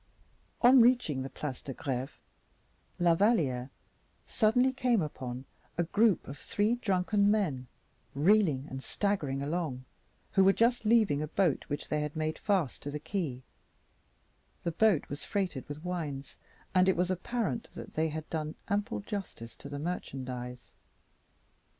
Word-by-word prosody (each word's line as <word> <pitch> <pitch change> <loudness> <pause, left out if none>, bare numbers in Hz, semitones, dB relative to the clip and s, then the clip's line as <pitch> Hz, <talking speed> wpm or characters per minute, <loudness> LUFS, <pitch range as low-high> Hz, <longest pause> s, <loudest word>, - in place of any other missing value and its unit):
On 250 +1 +8
reaching 235 - +3
the 135 - -4
Place 135 -1 -5
de 135 - -7
Greve 130 0 -4 0.8
La 175 -1 +4
Valliere 160 - +2 0.6
suddenly 245 +4 +3
came 250 -3 +2
upon 130 -5 -4 0.3
a 175 - +3
group 205 +3 +2
of 135 0 -8
three 210 +1 +1
drunken 200 -3 +2
men, 160 -12 0 0.5
reeling 155 -4 +3
and 135 -2 -7
staggering 150 -10 -1
along, 145 -5 -2 0.5
who 195 - +5
were 195 +1 +6
just 235 +1 +2
leaving 215 -10 +4
a 155 - -2
boat 170 -3 +1
which 145 +1 -4
they 150 - 0
had 150 +1 -4
made 155 0 -2
fast 185 - 0
to 145 - -5
the 145 - -3
quay; 150 -8 -3 1.2
the 170 - 0
boat 190 -1 +3
was 145 +2 -6
freighted 185 -10 -2
with 145 +2 -7
wines, 150 -6 -4 0.3
and 185 0 +5
it 190 - +2
was 180 +1 +1
apparent 230 +5 -2
that - - -8
they 160 +1 +1
had 155 +1 -5
done 155 -1 -3
ample 205 +3 -1
justice 195 - -6
to - - -9
the 145 - -5
merchandise. 130 -6 -5
165 Hz, 150 wpm, -31 LUFS, 140-205 Hz, 1.2 s, On